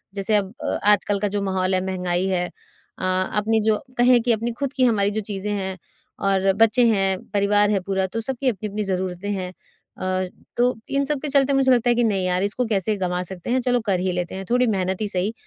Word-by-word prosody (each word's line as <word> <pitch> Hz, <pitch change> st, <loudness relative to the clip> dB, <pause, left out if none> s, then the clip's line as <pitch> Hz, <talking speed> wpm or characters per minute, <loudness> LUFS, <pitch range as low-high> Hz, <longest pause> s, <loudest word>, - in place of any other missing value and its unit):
जैसे 205 Hz, +2 st, +1 dB
अब 200 Hz, 0 st, 0 dB
अ, -, -, -1 dB
आजकल 205 Hz, 0 st, +2 dB
का 205 Hz, -, 0 dB
जो 205 Hz, 0 st, -2 dB
माहौल 190 Hz, -1 st, 0 dB
है, 185 Hz, -, +1 dB
महँगाई 180 Hz, -1 st, -1 dB
है 180 Hz, -2 st, 0 dB
अ, -, -, -16 dB
अपने 205 Hz, +4 st, +1 dB
जो 215 Hz, -, +3 dB, 0.2 s
कहें 245 Hz, 0 st, +5 dB
कि 240 Hz, +1 st, +1 dB
अपनी 230 Hz, +2 st, 0 dB
खुद 280 Hz, -1 st, -2 dB
की 260 Hz, -, +2 dB
हमारी 205 Hz, -3 st, +2 dB
जो 220 Hz, -, -2 dB
चीज़ें 200 Hz, +1 st, -3 dB
हैं 190 Hz, -2 st, -3 dB, 0.4 s
और 195 Hz, -1 st, +2 dB
बच्चे 225 Hz, +3 st, +4 dB
हैं, 195 Hz, -3 st, +1 dB
परिवार 205 Hz, 0 st, +2 dB
है 200 Hz, -, +2 dB
पूरा, 190 Hz, 0 st, -1 dB
तो 225 Hz, +5 st, -4 dB
सबकी 260 Hz, +2 st, -1 dB
अपनी-अपनी 210 Hz, 0 st, -3 dB
ज़रूरतें 185 Hz, 0 st, -3 dB
हैं 185 Hz, -2 st, -4 dB, 0.4 s
अ, 185 Hz, 0 st, -1 dB, 0.3 s
तो 245 Hz, +1 st, +3 dB
इन 275 Hz, 0 st, +1 dB
सबके 295 Hz, 0 st, -1 dB
चलते 280 Hz, 0 st, +3 dB
मुझे 270 Hz, -1 st, +3 dB
लगता 245 Hz, -1 st, +3 dB
है 240 Hz, -, +4 dB
कि 240 Hz, -, +2 dB
नहीं 195 Hz, -4 st, +1 dB
यार, 180 Hz, +1 st, +1 dB
इसको 225 Hz, +5 st, -1 dB
कैसे 210 Hz, -1 st, 0 dB
गँवा 180 Hz, -1 st, -1 dB
सकते 180 Hz, +3 st, -8 dB
हैं, 255 Hz, -, +2 dB
चलो 245 Hz, -1 st, +1 dB
कर 190 Hz, -3 st, +1 dB
ही 185 Hz, 0 st, 0 dB
लेते 180 Hz, 0 st, -3 dB
हैं, 195 Hz, -, -6 dB
थोड़ी 250 Hz, 0 st, +3 dB
मेहनत 190 Hz, -2 st, -1 dB
ही 215 Hz, -, 0 dB
सही 195 Hz, +2 st, -1 dB
200 Hz, 225 wpm, -23 LUFS, 190-230 Hz, 0.4 s, कहें